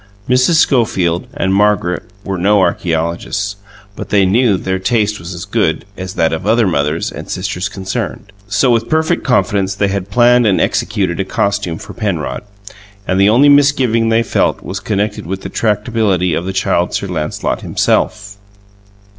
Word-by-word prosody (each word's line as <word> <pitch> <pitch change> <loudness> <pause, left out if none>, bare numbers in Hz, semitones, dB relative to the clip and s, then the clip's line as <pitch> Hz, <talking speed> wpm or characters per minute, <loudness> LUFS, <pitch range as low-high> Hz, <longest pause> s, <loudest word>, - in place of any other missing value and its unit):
Mrs. 125 +6 +3
Schofield 110 - +1
and 115 -10 -1
Margaret 100 -3 +1 0.2
were 95 -2 -3
no 100 +3 +3
archeologists, 85 +4 -1 0.4
but - - -7
they 100 -2 +3
knew 105 +1 +3
that - - -10
their 95 0 -1
taste 105 +1 0
was 85 +2 -7
as 85 +1 -7
good 100 -6 0
as 95 -1 -7
that 80 0 +1
of 80 +5 -4
other 115 +1 +3
mothers 75 -2 -1
and - - -9
sisters 95 0 -3
concerned; 100 +1 -5 0.2
so 105 +6 +2
with 115 -1 0
perfect 160 0 +1
confidence 100 -6 +1
they 100 0 0
had 100 0 -3
planned 120 +2 +4
and 100 - +2
executed 95 -5 -1
a - - +1
costume 100 -3 -1
for - - -10
Penrod; 85 - -3 0.7
and 95 +1 +1
the 100 - +5
only 125 +7 +5
misgiving 135 -6 +3
they 115 +1 +3
felt - - 0
was 95 +1 -5
connected 105 -3 -2
with 95 +2 -4
the - - -6
tractability 105 -5 0
of 85 - -2
the - - -1
Child 90 -2 0
Sir - - -2
Lancelot 80 -5 -3
himself. 105 -1 -1
100 Hz, 170 wpm, -15 LUFS, 90-115 Hz, 0.7 s, the